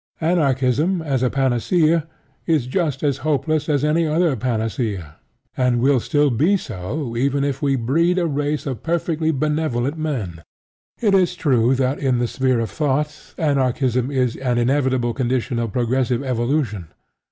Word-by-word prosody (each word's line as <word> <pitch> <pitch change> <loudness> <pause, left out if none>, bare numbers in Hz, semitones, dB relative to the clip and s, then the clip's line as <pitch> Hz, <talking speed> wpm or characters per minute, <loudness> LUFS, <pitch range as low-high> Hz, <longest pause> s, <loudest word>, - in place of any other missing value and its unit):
Anarchism, 155 +1 +1
as 135 -5 -1
a 130 - +2
panacea, 155 - +1 0.4
is 155 -7 +2
just 145 0 -1
as 140 -2 0
hopeless 155 +1 0
as 145 -1 +1
any 160 +2 +2
other 160 -1 +2
panacea, 110 - -3 0.4
and 125 -2 +1
will 135 +1 +3
still 145 +4 +1
be 160 - +3
so 115 - -5
even 140 +3 +1
if 140 +1 -2
we 140 -2 +2
breed 160 +9 +1
a 180 - +1
race 145 -1 -1
of 130 -5 -4
perfectly 165 -1 -1
benevolent 150 -2 -1
men. 110 - -3 0.6
It 210 -4 +2
is 185 -2 +3
true 130 -6 +2
that 130 +1 0
in 130 -3 +1
the 120 - +1
sphere 130 0 0
of 115 - -3
thought, 150 0 -2
Anarchism 130 -4 +1
is 130 -4 0
an 125 -2 -1
inevitable 130 -1 +1
condition 125 -1 -1
of 115 -2 -2
progressive 125 +2 0
evolution. 120 - -1
135 Hz, 150 wpm, -21 LUFS, 120-155 Hz, 0.6 s, will